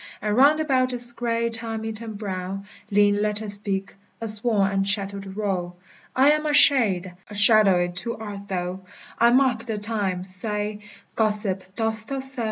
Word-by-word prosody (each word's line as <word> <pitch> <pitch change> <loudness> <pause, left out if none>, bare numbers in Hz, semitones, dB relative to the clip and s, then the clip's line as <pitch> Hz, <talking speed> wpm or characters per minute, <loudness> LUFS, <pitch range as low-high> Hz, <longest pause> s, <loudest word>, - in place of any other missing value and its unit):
And 210 0 -2
round 285 +5 +4
about 260 -4 0
its 240 -1 +1
gray, 235 -1 -2
time 225 -1 -4
eaten 220 0 -7
brow 195 -1 -5 0.3
Lean 205 0 +2
letters 210 0 +2
speak, 200 -1 0 0.3
a 225 - -5
worn 210 -5 +1
and 195 0 -1
shattered 200 -1 -2
row: 185 -4 -3 0.4
=I 270 +3 +5
am 305 0 0
a 295 - 0
Shade; 200 -12 +4 0.2
a 210 - -9
Shadowe 200 -4 +5
too 185 +7 -3
art 205 -2 -8
thou: 180 -1 -4 0.4
I 235 - +5
marke 250 -2 +1
the 220 -2 -3
Time: 205 -4 -2
saye, 210 +2 -4 0.3
Gossip, 205 -4 -1
dost 220 -1 0
thou 275 - -4
soe? 265 -1 +4
210 Hz, 165 wpm, -23 LUFS, 195-235 Hz, 0.4 s, =I